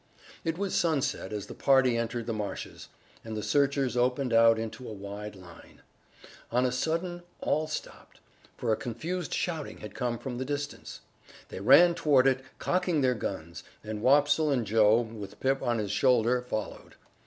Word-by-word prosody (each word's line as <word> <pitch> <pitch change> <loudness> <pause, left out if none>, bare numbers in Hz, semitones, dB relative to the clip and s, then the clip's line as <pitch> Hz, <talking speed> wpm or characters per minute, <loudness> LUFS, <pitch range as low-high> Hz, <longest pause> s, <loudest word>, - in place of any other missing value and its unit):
It 165 0 -2
was 200 0 -2
sunset 160 -10 0
as 105 -2 -4
the - - -9
party 130 -3 +3
entered 115 0 -2
the 115 - -2
marshes, 105 -2 -6 0.4
and 110 -1 -6
the 105 - -4
searchers 140 -3 +1
opened 125 +1 +1
out 115 0 +6
into 115 +3 -6
a - - -6
wide 100 +1 -7
line. 90 -3 -15 0.7
On 125 +2 +2
a 125 - +1
sudden 170 +7 -2 0.2
all 155 +1 0
stopped, 155 - -8 0.4
for 115 -2 0
a - - +2
confused 155 +11 -4
shouting 165 -4 -3
had 105 - -9
come 120 -2 -2
from 125 0 -6
the - - -1
distance. 145 +1 -5 0.5
They - - -7
ran 140 - +7
toward 145 -6 +3
it, 130 -1 +2
cocking 180 -4 0
their 130 -1 +3
guns, 85 -7 -5 0.2
and 110 -1 -5
Wopsle 145 +4 +4
and 130 -5 +1
Joe, 110 +2 +4
with 105 -3 -8
Pip 135 +1 +1
on 120 -1 0
his 105 -3 -2
shoulder, 125 0 +3
followed. 110 -4 -6
125 Hz, 170 wpm, -29 LUFS, 110-145 Hz, 0.7 s, ran